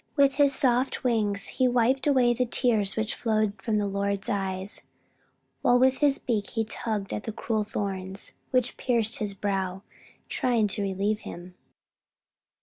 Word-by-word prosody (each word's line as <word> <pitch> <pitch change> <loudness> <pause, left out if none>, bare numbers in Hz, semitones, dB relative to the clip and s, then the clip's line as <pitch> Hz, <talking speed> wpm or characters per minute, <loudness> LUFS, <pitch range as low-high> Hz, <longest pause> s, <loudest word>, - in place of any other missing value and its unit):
With 280 -2 +4
his 285 -1 +5
soft 260 -1 +1
wings 215 -5 +1
he 255 - +1
wiped 250 +3 +2
away 255 -4 +4
the 250 +1 0
tears 225 -5 +2
which 220 0 0
flowed 215 -2 0
from 220 -2 0
the 205 - +1
Lord's 200 0 -2
eyes, 190 0 -2 0.8
while 245 - +4
with 260 +1 +3
his 285 -2 +4
beak 215 -4 -2
he 225 -1 -1
tugged 215 -2 -3
at 210 - -4
the 225 - -3
cruel 220 0 -1
thorns 195 -2 -4 0.2
which 250 -1 0
pierced 230 -3 +1
His 205 -2 -3
brow, 195 -1 -2 0.4
trying 240 -4 +1
to 205 - -2
relieve 200 +2 0
Him. 180 -2 -9
220 Hz, 155 wpm, -27 LUFS, 200-245 Hz, 0.8 s, his